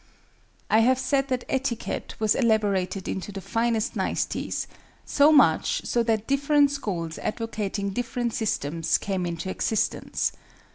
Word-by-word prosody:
I 220 - +4
have 250 +3 +4
said 270 +1 +1
that 255 -2 -1
etiquette 265 -3 -2
was 215 -1 +2
elaborated 205 -5 +1
into 190 +2 -4
the 195 - -6
finest 230 +2 -1
niceties, - - -2 0.4
so 290 +2 +5
much 290 -3 +4
so 240 - +1
that 220 -2 0
different 280 +1 +3
schools 180 - -4
advocating 210 -3 -3
different 240 +1 -2
systems, 165 -7 0
came 190 -3 -2
into 170 +2 -4
existence. 220 +2 -1
225 Hz, 130 wpm, -25 LUFS, 195-255 Hz, 0.4 s, so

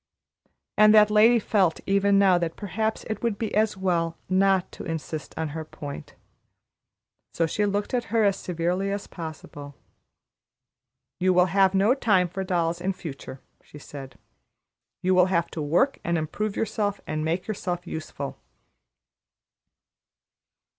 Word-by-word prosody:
And 215 0 +7
that 210 0 +6
lady 220 +3 +6
felt 195 -6 +1
even 200 0 +3
now 190 -3 +5
that 165 -1 -3
perhaps 220 +2 -3
it 220 - -5
would 230 -4 -1
be 220 -1 -3
as 215 -2 +1
well 170 -3 0
not 190 0 +2
to - - -9
insist 160 -2 -5
on 160 -1 -2
her 160 +2 -5
point. 145 -2 -9 1.2
So 165 - +2
she 205 +6 0
looked 205 +3 -2
at 245 -2 0
her 225 +1 +1
as 200 -2 +3
severely 180 +3 -2
as 200 0 -3
possible. 155 -4 -9 1.4
"You 185 0 +3
will 180 0 +5
have 195 -1 +4
no 200 +5 +4
time 200 -9 +2
for 190 +2 -4
dolls 170 -2 -1
in 190 +2 -1
future," 140 -6 -9 0.2
she - - -14
said; 140 -2 -10 0.9
"you 185 +1 +3
will 180 0 +5
have 170 -2 0
to 160 - -5
work 175 - +1
and 170 0 0
improve 195 +7 -3
yourself, 205 -2 -1
and 155 0 -3
make 165 +3 -1
yourself 180 -4 -4
useful." 155 -4 -6
185 Hz, 145 wpm, -25 LUFS, 165-205 Hz, 1.4 s, And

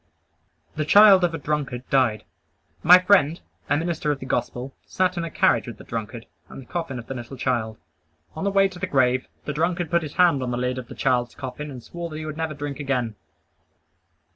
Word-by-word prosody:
The 155 - 0
child 200 +3 +7
of 170 -2 +1
a - - -3
drunkard 140 -4 -3
died. 125 -6 +2 0.6
My 180 +3 +9
friend, 180 -4 +3 0.3
a 145 - +3
minister 160 -2 -1
of 145 - -1
the 130 - -7
Gospel, 130 0 -3
sat 185 0 0
in 170 - -2
a 165 - -4
carriage 190 -3 +2
with 115 -3 -7
the - - -12
drunkard, 115 0 -6 0.2
and - - -10
the 135 - -11
coffin 165 -3 -4
of 120 - -8
the 135 - -6
little 125 +1 -8
child. 115 -4 -1 0.6
On - - -5
the 200 - +1
way 195 0 +4
to 185 -2 -11
the 185 - -2
grave, 130 -4 +2 0.2
the 150 - -3
drunkard 170 +2 -1
put 170 - +3
his 150 -3 -7
hand 175 -6 +4
on 125 - -2
the 120 - -2
lid 125 +1 -1
of 125 - -9
his - - -11
child's 120 -1 0
coffin 145 +3 -6
and 125 -4 -9
swore 170 0 -7
that 155 - -7
he 155 - -5
never 155 +1 -3
would 155 - -8
drink 145 -1 -5
again. 125 -6 -1
145 Hz, 220 wpm, -24 LUFS, 125-170 Hz, 0.6 s, My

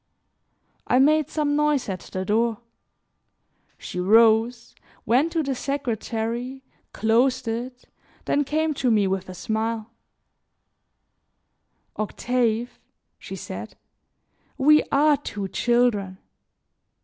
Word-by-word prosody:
I 250 - +3
made 305 +2 +4
some 295 -2 0
noise 300 -3 +1
at 190 -2 -3
the 185 0 -6
door. 225 +2 +1 1.2
She 180 - -6
rose, 225 +4 +3 0.3
went 265 +9 +2
to 325 -2 +1
the 275 -1 -1
secretary, 245 -1 -3 0.3
closed 250 +3 +1
it, 245 +2 -5 0.4
then 290 - +1
came 310 +2 0
to 260 -3 0
me 210 -3 +3
with 190 -1 -2
a 185 - -8
smile: 220 +3 -3 2.1
"Octave," 235 +2 -1 0.4
she - - -8
said, - - -8 0.8
"we 300 +3 +6
are 295 +1 +4
two 205 -8 -5
children. 230 -5 +1
240 Hz, 100 wpm, -24 LUFS, 220-275 Hz, 2.1 s, we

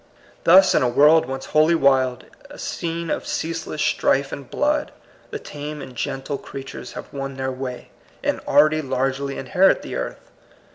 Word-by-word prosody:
Thus, 185 +2 +7
in - - +3
a 125 - +2
world 150 +3 +5
once 135 0 -5
wholly 155 +2 +5
wild, 130 -4 +2 0.2
a - - -11
scene 170 0 -4
of - - -3
ceaseless 165 -2 -3
strife 135 0 +1
and 140 -3 -8
blood, 300 0 0 0.4
the 435 - -4
tame 150 - -7
and 130 - -9
gentle 135 +3 -3
creatures 135 0 -8
have - - -9
won 135 -1 -5
their 130 0 -2
way, 130 -1 -6 0.3
and - - 0
already 155 +2 +4
largely 135 0 -2
inherit 180 +9 +3
the - - -7
earth. - - -6
140 Hz, 160 wpm, -22 LUFS, 135-165 Hz, 0.4 s, Thus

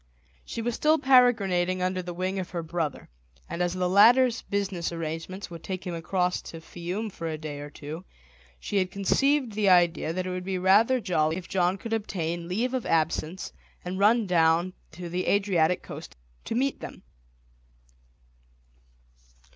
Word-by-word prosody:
She 230 - -5
was 240 +1 -1
still 310 +6 +3
peregrinating 200 - +3
under 185 0 0
the 175 0 -6
wing 185 +2 -2
of 185 - -5
her 170 -2 -4
brother, 160 -2 -3 0.4
and 170 - -4
as 175 0 0
the 180 -1 0
latter's 235 +6 +5
business 195 -4 -2
arrangements 165 +3 -5
would 165 -1 -9
take 185 -1 -5
him 180 - -3
across 180 +2 -1
to 165 - -9
Fiume 180 +6 -5
for 165 - -6
a 160 -1 -3
day 150 -2 -6
or 145 0 -7
two, 150 +4 -8 0.6
she 200 - -3
had 185 -1 +1
conceived 265 +7 +1
the 205 -1 +2
idea 175 -3 +4
that 185 +2 -3
it 185 - -3
would 180 0 -4
be 190 0 -2
rather 210 +8 +4
jolly 165 -6 0
if 185 - -7
John 185 0 +1
could 225 +3 -5
obtain 170 -6 -2
leave 230 +8 -1
of 255 -2 -2
absence 165 +2 -1 0.3
and 185 +2 -4
run 220 +3 +4
down 170 0 +3 0.2
to 175 +2 -7
the 180 +2 -3
Adriatic 180 -4 +2
coast - - -9 0.3
to - - -3
meet 270 +3 0
them. - - -9
185 Hz, 170 wpm, -27 LUFS, 170-205 Hz, 0.6 s, latter's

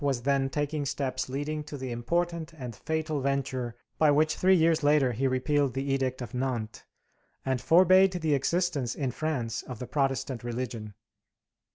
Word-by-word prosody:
was 135 -4 0
then 135 0 +2
taking 145 +1 -2
steps 130 -2 -2
leading 150 +3 -3
to 150 -1 -8
the 130 -2 -5
important 170 +7 -2
and 125 -7 -7
fatal 155 +2 -2
venture 130 -3 -2 0.2
by 155 - +5
which 155 +2 +3
three 190 +1 +4
years 165 -1 +3
later 145 -3 +4
he 130 +4 0
repealed 130 +1 +1
the 135 0 -1
Edict 130 -2 -1
of 120 - -9
Nantes, 125 -4 -3 0.6
and 130 -2 0
forbade 185 +6 +6
the 160 -4 0
existence 145 -3 0
in 135 -4 -2
France 125 -6 -2
of 125 - -8
the 125 - -6
Protestant 135 -2 -1
religion. 115 -3 -5
135 Hz, 165 wpm, -28 LUFS, 125-155 Hz, 0.6 s, forbade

